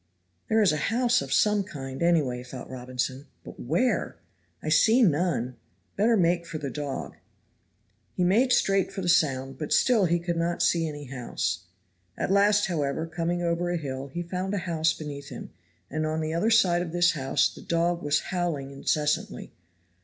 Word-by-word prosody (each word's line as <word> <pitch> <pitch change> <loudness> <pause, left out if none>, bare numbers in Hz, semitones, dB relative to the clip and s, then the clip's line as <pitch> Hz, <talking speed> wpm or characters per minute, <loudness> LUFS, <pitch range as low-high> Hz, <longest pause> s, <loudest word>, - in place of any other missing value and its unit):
"There 220 0 +4
is 195 - +4
a 155 - -1
house 245 +2 +2
of - - -6
some 210 -1 +3
kind 135 -7 -7
anyway," 150 -8 +2
thought 125 +1 -9
Robinson, 130 +2 -4 0.2
"but - - -11
where? - - 0 0.5
I 155 - -2
see 225 +10 +5
none 145 - +1 0.4
better 225 +3 +3
make 170 -1 +1
for 165 - -5
the 140 -3 -5
dog." 145 0 -5 1.0
He 180 - +1
made 225 +9 +3
straight 195 -5 +2
for 195 -1 -5
the - - -2
sound, 135 -5 +1
but 150 - -5
still 230 -6 +4
he 170 0 +2
could 170 0 -3
not 170 +1 0
see 165 -1 +2
any 145 -1 -6
house. 125 - -3 0.5
At - - -1
last, 205 +1 +4
however, 155 -3 -1
coming 170 +2 -2
over 170 +1 0
a 175 - 0
hill 135 -3 -5
he 170 +6 -5
found 185 +3 -3
a 185 - -3
house 160 -2 +1
beneath 145 -3 -7
him, 125 - -8 0.4
and 155 +2 -3
on 155 +1 -1
the 155 0 -2
other 170 +7 +1
side 185 -6 +4
of 170 -2 -5
this 175 0 +4
house 135 -4 +1
the - - -12
dog 170 +1 0
was 145 0 +1
howling 170 -7 -2
incessantly. 150 +2 -1
170 Hz, 180 wpm, -27 LUFS, 140-180 Hz, 1.0 s, see